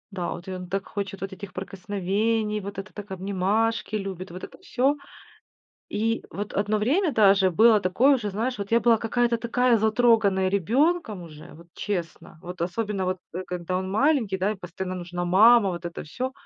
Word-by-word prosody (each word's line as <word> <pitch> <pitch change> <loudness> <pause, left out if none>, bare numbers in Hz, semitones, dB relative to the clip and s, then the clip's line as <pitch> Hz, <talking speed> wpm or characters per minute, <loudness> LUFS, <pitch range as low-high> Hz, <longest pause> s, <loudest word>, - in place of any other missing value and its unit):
Да, 180 -3 -3
в - - -7
эт 175 - -17
он 185 -1 -6
так 195 +2 -3
хочет 195 -1 -5
вот 195 +1 -4
этих 190 0 -9
прикосновений, 205 +3 -1
вот 200 0 -7
это 195 +1 -7
так 205 -1 -9
обнимашки 200 +4 -1
любит, 195 -2 -5
вот 180 +2 -9
это - - -9
всё. 270 +3 0 0.9
И 225 +2 -1
вот 205 +1 -5
одно 205 +1 +1
время 300 - +1
даже 200 -5 +5
было 220 +3 +5
такое 245 +10 +4
уже, 220 -5 -3
знаешь, 225 +5 -2
вот 200 0 -6
я 230 - +5
была 235 -1 +4
какая-то 235 +1 +1
такая 240 +1 +2
затроганная 220 -3 +3
ребенком 225 - +1
уже, 155 0 -12
вот 170 +1 -15
честно, 170 -4 -5
вот 180 -1 -8
особенно, 195 +2 -2
вот, 185 0 -1 0.2
э, 185 +2 -4
когда 180 0 -4
он 190 0 -4
маленький, 230 -3 +2
да, 190 +3 0
и - - -4
постоянно 185 0 -6
нужна 175 0 -4
мама, 210 +4 +6
вот 175 -1 -5
это 170 - -6
всё. 250 - -4
200 Hz, 185 wpm, -25 LUFS, 185-225 Hz, 0.9 s, мама